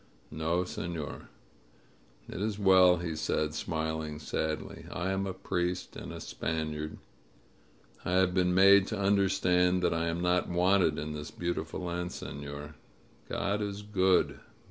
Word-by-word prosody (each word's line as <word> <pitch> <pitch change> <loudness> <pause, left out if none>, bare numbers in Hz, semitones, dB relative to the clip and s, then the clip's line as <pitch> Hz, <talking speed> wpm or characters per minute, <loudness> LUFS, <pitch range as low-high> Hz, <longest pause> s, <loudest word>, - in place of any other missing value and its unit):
"No, 80 +3 0
senor." 85 -4 -5 1.0
"It - - -6
is 105 -1 -1
well," 95 -3 +6
he 85 -2 -3
said, 75 0 -1
smiling 80 -1 -3
sadly. 80 0 -3
"I 95 +1 -2
am 95 0 -1
a - - -2
priest 90 -1 -2
and - - -7
a - - -7
Spaniard. 75 -1 -3 1.1
I 90 - -1
have 95 -1 +3
been 90 -1 +2
made 100 +1 +7
to 110 - -3
understand 95 -2 +3
that - - +3
I 85 0 0
am 85 +1 -1
not 90 0 +1
wanted 90 -2 +3
in 75 0 -4
this 75 -1 -6
beautiful 85 +1 -3
land, 90 0 -3
senor. 70 +1 -7 0.6
God 100 +2 -1
is 100 0 -4
good. 95 -3 +2
90 Hz, 145 wpm, -30 LUFS, 80-95 Hz, 1.1 s, made